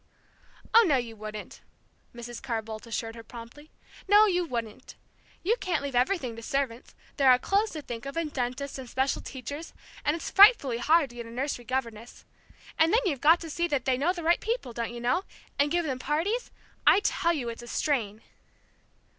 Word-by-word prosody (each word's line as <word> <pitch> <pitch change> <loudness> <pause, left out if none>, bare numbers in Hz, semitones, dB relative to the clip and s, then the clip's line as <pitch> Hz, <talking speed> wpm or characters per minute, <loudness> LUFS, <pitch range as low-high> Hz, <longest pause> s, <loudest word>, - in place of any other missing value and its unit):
"Oh, 460 - +8
no, 285 -5 +4
you 235 -2 -4
wouldn't," 215 0 -8 0.5
Mrs. 240 0 -8
Carr 230 -4 -2
Boldt 220 +1 -8
assured 225 0 -3
her 230 - -9
promptly. 240 +6 -12 0.4
"No, 415 +2 +7
you 360 -3 +1
wouldn't! 240 -5 -6 0.5
You 425 +7 +2
can't 340 -6 -1
leave 280 -1 -4
everything 250 -1 0
to 230 - -9
servants 255 -1 -3 0.2
there 275 -2 +5
are 250 - +7
clothes 405 - +1
to 310 -2 -6
think 240 +1 -7
of, 275 - -6
and 320 -3 -2
dentists, 260 +2 -3
and 255 -2 -8
special 265 +2 0
teachers, 285 +4 -8 0.3
and 295 - +1
it's 335 - -5
frightfully 390 - +6
hard 305 +1 +3
to 240 - -13
get 235 -1 -6
a - - -10
nursery 245 0 -3
governess. 235 -3 -4 0.5
And 320 +1 +5
then 460 - +4
you've 285 -9 -1
got 325 +3 +6
to 330 - -7
see 340 +3 0
that 285 -6 -1
they 260 - +2
know 290 +7 +1
the 350 -2 -6
right 340 +2 +3
people 445 - -3
don't 235 0 -3
you 240 - -7
know? 250 +10 +1 0.4
and 285 +1 +3
give 345 +2 0
them 265 -4 -3
parties 335 - -1 0.4
I 405 - +7
tell 340 -4 +1
you 255 -7 -3
it's 230 0 -7
a 240 - -11
strain." 230 -6 -1
270 Hz, 200 wpm, -28 LUFS, 235-330 Hz, 0.5 s, Oh